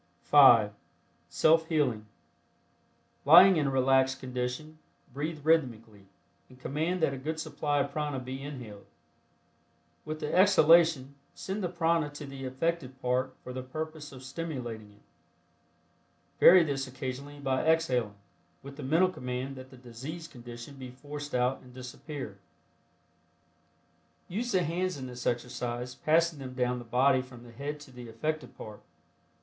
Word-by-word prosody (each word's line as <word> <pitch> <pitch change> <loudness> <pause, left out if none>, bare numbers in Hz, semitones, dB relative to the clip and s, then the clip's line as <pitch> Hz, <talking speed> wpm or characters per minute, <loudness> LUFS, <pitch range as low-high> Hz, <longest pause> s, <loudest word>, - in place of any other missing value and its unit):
(5) 120 -8 +7 0.6
SELF 160 +1 +3
HEALING. 130 -10 0 1.2
Lying 175 +5 +8
in 145 -2 +1
a - - +1
relaxed 135 0 +2
condition, 130 +5 -5 0.3
breathe 150 +2 -4
rhythmically, 115 -10 0 0.4
and 130 0 -17
command 160 +6 -2
that 140 - +2
a 135 - -6
good 160 +4 -4
supply 145 -2 -2
of 140 - -3
prana 150 -1 -2
be 130 +1 -7
inhaled. 125 -8 -9 1.2
With 155 0 -5
the 150 -1 -4
exhalation, 165 -7 +5 0.2
send 195 +2 -4
the 180 - -1
prana 165 -3 +1
to 145 - -7
the 135 -1 -8
affected 135 0 -2
part 130 +1 -1
for 125 - -7
the 130 - -4
purpose 155 +3 -6
of 130 -1 -11
stimulating 125 -8 -6
it. 105 - -24 1.4
Vary 180 0 +8
this 135 -3 -2
occasionally 130 +2 -6
by 135 -2 0
exhaling, 130 -10 +1 0.5
with 140 0 -10
the - - -7
mental 165 +7 +3
command 125 -2 -5
that 130 0 -10
the 130 - -14
diseased 135 +8 -8
condition 120 +2 -10
be 130 -1 -8
forced 145 +3 -7
out 125 +1 +1
and 125 -1 -16
disappear. 130 - -8 1.9
Use 235 +7 -3
the 185 -3 +2
hands 180 +1 -2
in 130 - -6
this 125 -1 -6
exercise, 120 0 -3
passing 160 +3 +1
them 130 -1 -8
down 125 -1 0
the 120 - -10
body 130 +3 +3
from 125 -2 -13
the 120 - -13
head 145 +5 -5
to 145 - -13
the 125 -2 -10
affected 155 +7 -4
part. 105 -1 -10
135 Hz, 145 wpm, -29 LUFS, 125-155 Hz, 1.9 s, Lying